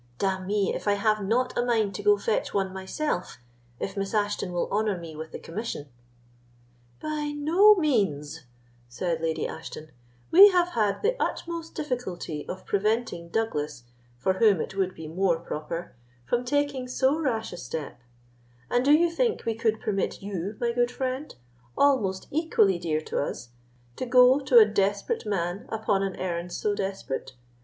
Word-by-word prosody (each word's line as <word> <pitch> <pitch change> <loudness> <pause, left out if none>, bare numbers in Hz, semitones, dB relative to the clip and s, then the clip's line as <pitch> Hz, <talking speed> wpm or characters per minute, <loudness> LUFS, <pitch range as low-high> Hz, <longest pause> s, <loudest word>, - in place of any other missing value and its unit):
D—n 190 +1 -1
me, 205 -1 +1
if - - -5
I 205 - +4
have 215 +1 +1
not 240 +6 0
a 240 - +1
mind 220 -5 +1
to - - -5
go 415 0 +5
fetch 475 - -1
one 190 -1 0
myself, 190 +3 -3 0.4
if 195 - -4
Miss 195 +1 -3
Ashton 205 -3 0
will 175 -1 -1
honour 210 -1 +1
me 165 -2 -9
with 160 +1 -7
the - - -6
commission." 165 -6 -6 1.1
"By 300 -1 -3
no 350 +9 +6
means," 160 - 0 0.4
said 165 +6 -2
Lady 160 -1 -1
Ashton; 155 -1 -8 0.4
"we 395 +4 +10
have 355 -2 +2
had 210 - 0
the 475 +4 +2
utmost 335 -1 -3
difficulty 190 - -4
of 185 - -6
preventing 210 -4 -1
Douglas, 150 - -2 0.3
for 185 +10 +1
whom 210 -6 +5
it 190 - -4
would 190 -1 -1
be 160 -1 -8
more 175 +1 +1
proper, 165 +1 -6 0.3
from 240 - 0
taking 285 -1 0
so 265 +4 +1
rash 230 - -1
a - - -7
step; 140 -3 -6 0.7
and 245 - +3
do 280 - +4
you 335 +3 +5
think 460 - 0
we 230 - +1
could 220 -1 0
permit 195 -2 -2
you, 200 +1 -4
my 235 -1 +1
good 240 0 +1
friend, 260 +3 -4 0.4
almost 220 -10 +2
equally 220 - +2
dear 155 -3 -1
to - - -2
us, 120 -4 -6 0.5
to 255 - -3
go 250 +2 +6
to 265 -3 +3
a 225 - +10
desperate 205 - -1
man 185 0 -2
upon 215 -3 0
an 195 -1 -2
errand 175 -1 -3
so 205 +3 -1
desperate? 190 -10 -4
205 Hz, 165 wpm, -27 LUFS, 175-255 Hz, 1.1 s, we